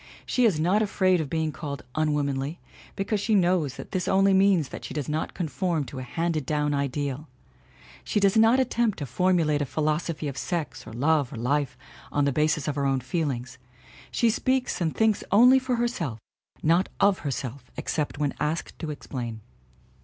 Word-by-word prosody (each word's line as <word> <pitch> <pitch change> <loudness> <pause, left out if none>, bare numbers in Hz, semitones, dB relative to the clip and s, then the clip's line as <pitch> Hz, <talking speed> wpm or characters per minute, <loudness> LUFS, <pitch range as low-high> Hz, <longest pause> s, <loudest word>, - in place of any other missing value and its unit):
She 250 - +2
is 190 -9 +3
not 185 +7 +3
afraid 185 -4 +2
of 150 - -5
being 160 0 -1
called 140 -2 -6
unwomanly, 150 0 -1 0.4
because 200 +2 -1
she 215 +2 +1
knows 175 -7 +2
that - - -9
this 185 -2 -1
only 195 0 +4
means 190 -6 +4
that - - -8
she - - -7
does 145 -4 -2
not 155 +1 -2
conform 165 0 -1
to 130 0 -7
a - - -4
handed 160 +4 -2
down 150 +1 0
ideal. 140 +1 -2 0.8
She - - 0
does 195 -1 +3
not 225 +3 +5
attempt 235 -4 +1
to 145 - -4
formulate 155 +2 +2
a - - +1
philosophy 155 +2 -1
of 140 -1 -4
sex 170 -5 -4
or - - -8
love 145 +2 +1
or - - -7
life 135 +4 -1 0.3
on 145 -1 +2
the 140 - +2
basis 155 +1 +1
of 150 - 0
her 140 -1 -1
own 135 -1 +1
feelings. 130 -3 -3 0.5
She 235 -2 +2
speaks 255 -1 0
and 160 -2 0
thinks 220 -2 +2
only 250 +6 +7
for 255 -1 -1
herself 235 - -2 0.5
not 170 +4 +3
of 200 -1 +4
herself 135 -2 -5
except 150 -2 -2
when 145 -2 0
asked 155 +3 -2
to 160 - -4
explain. 120 -6 -5
155 Hz, 185 wpm, -26 LUFS, 140-190 Hz, 0.8 s, only